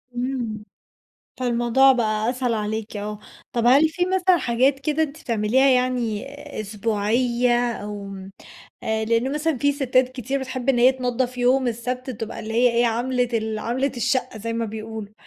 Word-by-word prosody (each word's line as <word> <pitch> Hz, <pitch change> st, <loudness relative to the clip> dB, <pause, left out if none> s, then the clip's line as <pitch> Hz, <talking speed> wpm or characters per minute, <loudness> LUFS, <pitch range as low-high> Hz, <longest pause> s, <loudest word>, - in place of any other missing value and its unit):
امم. 240 Hz, -4 st, -3 dB, 0.8 s
فالموضوع 245 Hz, +2 st, +4 dB
بقى 220 Hz, -1 st, 0 dB
أسهل 250 Hz, -2 st, -1 dB
عليكِ، 215 Hz, 0 st, -3 dB
آه، 210 Hz, 0 st, -5 dB, 0.3 s
طب 235 Hz, 0 st, 0 dB
هل 280 Hz, +6 st, +6 dB
فيه 355 Hz, +3 st, -1 dB
مثلًا 370 Hz, -1 st, +3 dB
حاجات 265 Hz, +1 st, +1 dB
كده 305 Hz, +2 st, 0 dB
أنتِ 310 Hz, 0 st, -4 dB
بتعمليها 235 Hz, +1 st, +2 dB
يعني 250 Hz, -3 st, +1 dB, 0.4 s
أسبوعية، 235 Hz, +3 st, +1 dB
أو 205 Hz, -2 st, -6 dB
م 195 Hz, 0 st, -9 dB, 0.5 s
آآ 220 Hz, 0 st, -1 dB
لإن 230 Hz, +4 st, +1 dB
مثلًا 300 Hz, -1 st, -1 dB
فيه 285 Hz, +3 st, +2 dB
ستات 255 Hz, -2 st, +2 dB
كتير 260 Hz, +2 st, -3 dB
بتحب 260 Hz, 0 st, -5 dB
إن 250 Hz, -3 st, +4 dB
هي 255 Hz, +2 st, +6 dB
تنضف 250 Hz, 0 st, -2 dB
يوم 255 Hz, +1 st, +3 dB
السَّبْت، 250 Hz, +3 st, -3 dB
بتبقى 225 Hz, -2 st, -6 dB
اللي 220 Hz, -, -6 dB
هي 245 Hz, +1 st, +4 dB
إيه 235 Hz, +1 st, +2 dB
عَمْلة 245 Hz, +2 st, 0 dB
ال 220 Hz, -1 st, -1 dB
عَمْلة 250 Hz, +5 st, -1 dB
الشّقّة 245 Hz, -1 st, -1 dB
زي 230 Hz, +2 st, -4 dB
ما 230 Hz, 0 st, -1 dB
بيقولوا، 220 Hz, -1 st, -7 dB
245 Hz, 160 wpm, -23 LUFS, 220-260 Hz, 0.8 s, هل